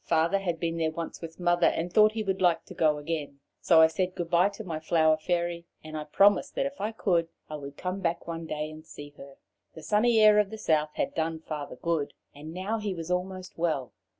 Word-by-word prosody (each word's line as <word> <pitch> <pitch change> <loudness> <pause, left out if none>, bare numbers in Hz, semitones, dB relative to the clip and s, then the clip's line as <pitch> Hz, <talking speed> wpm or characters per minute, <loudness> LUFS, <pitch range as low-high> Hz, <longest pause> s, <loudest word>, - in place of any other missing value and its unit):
Father 165 +4 +2
had 175 -4 -2
been 165 -1 -2
there 160 -1 +1
once 165 +1 -6
with 165 0 -9
Mother, 175 0 +3
and 175 +2 -1
thought 215 0 +6
he 220 -1 -2
would 190 -2 -2
like 175 -2 +3
to - - -10
go 155 -2 +2
again. 145 -2 -4 0.2
So 165 -2 +5
I - - +9
said 180 +3 -1
goodbye 175 +2 +2
to 220 - -6
my 165 -5 -4
Flower 160 0 +3
Fairy, 170 +1 -2 0.2
and 155 0 -8 0.2
promised 205 +7 +4
that - - 0
if 275 -3 -5
I 210 +2 -1
could 175 -6 +1 0.2
I 155 - -4
would 140 -1 -9
come 185 +2 -3
back 170 -3 -2
one 165 -1 -5
day 155 0 -4
to 155 - -11
see 145 -2 -11
her. 140 0 -12 0.4
The 160 - -10
sunny 225 +2 +3
air 215 -1 +7
of 210 -2 +2
the 220 - -7
south 155 -6 +1
had - - -1
done 160 0 -1
Father 150 -2 -6
good, 165 -4 -2 0.2
and 150 +2 -9
now 190 +6 -3
he 205 -3 -3
was 165 +1 -5
almost 185 0 -4
well. 155 -8 -1
170 Hz, 230 wpm, -28 LUFS, 160-190 Hz, 0.4 s, I